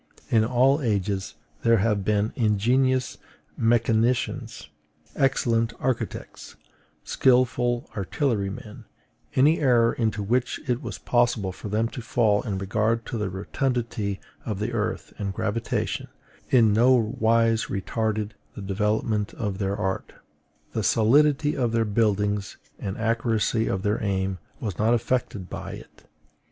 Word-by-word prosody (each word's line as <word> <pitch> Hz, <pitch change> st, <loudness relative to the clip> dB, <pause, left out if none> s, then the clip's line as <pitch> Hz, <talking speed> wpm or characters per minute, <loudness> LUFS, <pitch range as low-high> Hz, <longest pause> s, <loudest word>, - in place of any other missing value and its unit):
In 110 Hz, -2 st, +5 dB
all 130 Hz, +5 st, +3 dB
ages 100 Hz, -5 st, -1 dB, 0.3 s
there 115 Hz, 0 st, +4 dB
have 105 Hz, -1 st, +1 dB
been 105 Hz, +1 st, +1 dB
ingenious 125 Hz, +4 st, +1 dB, 0.4 s
mechanicians, 115 Hz, +1 st, +1 dB, 0.5 s
excellent 115 Hz, -4 st, +1 dB
architects, 130 Hz, -2 st, -4 dB, 0.5 s
skilful 125 Hz, -1 st, +2 dB
artillerymen: 105 Hz, -, -2 dB, 0.5 s
any 150 Hz, +5 st, +4 dB
error, 120 Hz, -5 st, +4 dB
into 110 Hz, -3 st, -1 dB
which 125 Hz, +5 st, 0 dB
it 125 Hz, -1 st, 0 dB
was -, -, -6 dB
possible 120 Hz, -5 st, +1 dB
for 100 Hz, -, -8 dB
them 110 Hz, +3 st, +1 dB
to 125 Hz, -, -7 dB
fall 115 Hz, -5 st, +2 dB
in 100 Hz, -5 st, -3 dB
regard 110 Hz, +4 st, 0 dB
to 120 Hz, -, -4 dB
the 105 Hz, -2 st, -1 dB
rotundity 110 Hz, 0 st, -2 dB, 0.2 s
of 105 Hz, -4 st, -3 dB
the 105 Hz, +4 st, -2 dB
earth 115 Hz, -1 st, -3 dB
and 100 Hz, -2 st, -3 dB
gravitation, 115 Hz, +3 st, -2 dB, 0.4 s
in 115 Hz, -5 st, +5 dB
no 120 Hz, +4 st, +5 dB
wise 115 Hz, -1 st, +2 dB
retarded 110 Hz, +1 st, -2 dB, 0.2 s
the -, -, -7 dB
development 105 Hz, +2 st, -1 dB
of 100 Hz, -3 st, -3 dB
their 100 Hz, 0 st, -1 dB
art; 95 Hz, 0 st, -3 dB, 0.6 s
the 110 Hz, -, -1 dB
solidity 145 Hz, +8 st, +3 dB
of 120 Hz, -3 st, 0 dB
their 115 Hz, -1 st, +2 dB
buildings 105 Hz, -1 st, 0 dB, 0.2 s
and 95 Hz, 0 st, -4 dB
accuracy 115 Hz, 0 st, +1 dB
of 95 Hz, 0 st, -2 dB
their 105 Hz, +2 st, 0 dB
aim 95 Hz, -2 st, -1 dB, 0.2 s
was 105 Hz, -7 st, -4 dB
not 110 Hz, +3 st, +4 dB
affected 115 Hz, -5 st, -2 dB
by -, -, -6 dB
it. -, -, -13 dB
110 Hz, 130 wpm, -25 LUFS, 105-120 Hz, 0.6 s, In